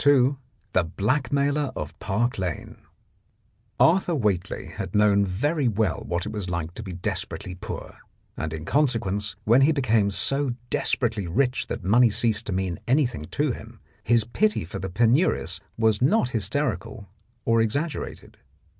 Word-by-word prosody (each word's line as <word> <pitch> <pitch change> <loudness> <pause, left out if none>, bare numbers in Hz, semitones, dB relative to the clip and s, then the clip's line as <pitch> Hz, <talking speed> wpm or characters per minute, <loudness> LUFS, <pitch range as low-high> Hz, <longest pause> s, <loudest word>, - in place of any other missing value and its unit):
24 140 -1 +4 0.4
THE 95 - +3
BLACKMAILER 140 - 0
OF 75 - -6
PARK 115 +3 -1
LANE 90 -4 -4 1.0
Arthur 175 0 +4
Whately 100 - -1
had - - -5
known 105 -1 +4
very 140 - 0
well 105 -5 +1
what 85 0 -1
it 105 - -4
was 105 -4 -3
like 85 -1 -3
to 110 - -7
be 95 -4 -7
desperately 90 +1 -3
poor, 105 +4 -8 0.4
and 80 - -3
in 80 0 -6
consequence, 110 - 0
when 120 +5 +5
he 140 +4 +5
became 115 -8 +2
so 135 +5 0 0.2
desperately 110 -6 0
rich 125 +9 0
that 115 - -5
money 115 +6 +5
ceased 110 +1 0
to - - -2
mean 95 -2 -2
anything 125 - +1
to 140 - 0
him, 115 0 -9 0.2
his 115 +1 +3
pity 210 - 0
for 80 - -6
the 95 - -4
penurious 115 - +2 0.2
was 110 -1 +2
not 145 - +3
hysterical 110 - -2 0.4
or 115 0 +3
exaggerated. 145 +9 -3
110 Hz, 150 wpm, -25 LUFS, 95-135 Hz, 1.0 s, when